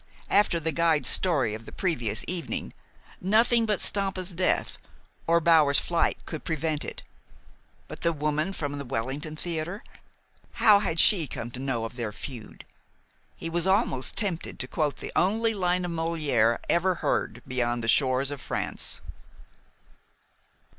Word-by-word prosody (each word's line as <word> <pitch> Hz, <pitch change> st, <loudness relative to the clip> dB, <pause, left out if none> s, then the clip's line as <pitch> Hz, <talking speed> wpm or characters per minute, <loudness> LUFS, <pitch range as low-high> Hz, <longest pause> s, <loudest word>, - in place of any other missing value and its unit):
After 200 Hz, -4 st, +3 dB
the 160 Hz, 0 st, -1 dB
guide's 165 Hz, -2 st, +2 dB
story 145 Hz, -, +2 dB
of 110 Hz, +1 st, -8 dB
the -, -, -8 dB
previous 120 Hz, -, -2 dB
evening, 175 Hz, -2 st, -2 dB, 0.5 s
nothing 225 Hz, +4 st, +3 dB
but 210 Hz, -2 st, +1 dB
Stampa's 195 Hz, -2 st, +1 dB
death 180 Hz, +2 st, 0 dB, 0.5 s
or 170 Hz, +1 st, +4 dB
Bower's 155 Hz, -4 st, +5 dB
flight 170 Hz, -1 st, +1 dB
could 155 Hz, -, -6 dB
prevent 160 Hz, -1 st, -1 dB
it. -, -, -7 dB, 0.8 s
But -, -, -10 dB
the 170 Hz, -, +2 dB
woman 155 Hz, +3 st, -1 dB
from 145 Hz, -5 st, -4 dB
the -, -, -4 dB
Wellington 135 Hz, +5 st, -3 dB
Theater, 170 Hz, +5 st, -4 dB, 0.7 s
how 210 Hz, -2 st, +6 dB
had 165 Hz, -5 st, -1 dB
she 170 Hz, -5 st, +5 dB
come 120 Hz, -1 st, -6 dB
to 125 Hz, -, -5 dB
know 130 Hz, -4 st, -2 dB
of 115 Hz, +3 st, -8 dB
their 115 Hz, -3 st, -3 dB
feud? 115 Hz, +1 st, -9 dB, 0.7 s
He -, -, -6 dB
was 170 Hz, +2 st, 0 dB
almost 190 Hz, -, +1 dB
tempted 190 Hz, -6 st, 0 dB
to 130 Hz, -, -4 dB
quote 150 Hz, 0 st, -1 dB
the -, -, -7 dB
only 225 Hz, +5 st, +2 dB
line 180 Hz, -2 st, 0 dB
of 175 Hz, -, -4 dB
Molière 155 Hz, -9 st, +1 dB
ever 180 Hz, +2 st, +2 dB
heard 120 Hz, -7 st, -2 dB
beyond 120 Hz, -2 st, -1 dB
the -, -, -2 dB
shores 130 Hz, +2 st, +2 dB
of 140 Hz, -3 st, -6 dB
France. -, -, -3 dB
160 Hz, 150 wpm, -27 LUFS, 130-180 Hz, 0.8 s, how